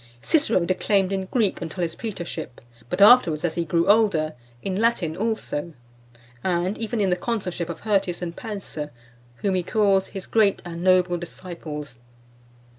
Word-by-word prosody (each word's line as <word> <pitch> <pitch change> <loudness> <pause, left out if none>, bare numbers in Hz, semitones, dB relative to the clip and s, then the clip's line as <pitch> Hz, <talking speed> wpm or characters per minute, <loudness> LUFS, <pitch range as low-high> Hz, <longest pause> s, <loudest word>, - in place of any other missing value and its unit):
Cicero 285 - +2
declaimed 190 +1 +1
in 190 -1 -1
Greek 215 -4 0
until 170 +2 -3
his 165 - -2
praetorship, 175 - -6 0.3
but 185 +3 +3
afterwards, 200 -9 +6
as 170 - 0
he 170 - -1
grew 165 +1 +1
older, 200 -8 +3 0.3
in 195 +1 -1
Latin 190 -9 +1
also; 205 -7 -2 0.7
and 180 +2 0
even 230 0 -2
in 195 -3 +2
the - - +4
consulship 180 -4 -3
of 170 - -6
Hirtius 195 -4 0
and 170 -1 -4
Pansa, 195 -9 -6 0.5
whom 200 -2 +2
he 185 - +1
calls 195 0 +2
"his 195 -2 -7
great 215 -3 +3
and 170 0 -6
noble 180 -1 +4
disciples." 160 -6 -7
185 Hz, 155 wpm, -24 LUFS, 170-205 Hz, 0.7 s, afterwards